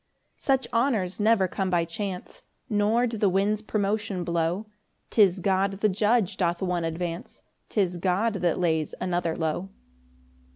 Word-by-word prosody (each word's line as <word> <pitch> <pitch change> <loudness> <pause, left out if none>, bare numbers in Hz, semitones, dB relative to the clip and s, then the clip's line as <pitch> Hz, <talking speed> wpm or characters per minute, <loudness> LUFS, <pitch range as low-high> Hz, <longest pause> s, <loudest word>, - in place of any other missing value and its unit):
5 - - -26 0.2
Such - - -10
honours 230 -7 +1
never 210 -2 +4
come 190 +1 -2
by 175 -2 +2
chance, 185 +2 -6 0.3
Nor 215 +3 +2
do 230 -2 -3
the 205 -2 +3
winds 200 +3 +1
promotion 205 -3 -1
blow; 170 +4 -1 0.5
'Tis 200 -4 +4
God 195 +1 +1
the 210 +2 +1
judge 210 0 +1
doth 170 -2 0
one 180 -2 0
advance, 165 +1 -4 0.3
'Tis 185 -4 0
God 190 +5 +1
that 175 -2 +1
lays 160 -3 0
another 175 -3 -1
low. 160 +4 -2
190 Hz, 150 wpm, -26 LUFS, 175-210 Hz, 0.5 s, never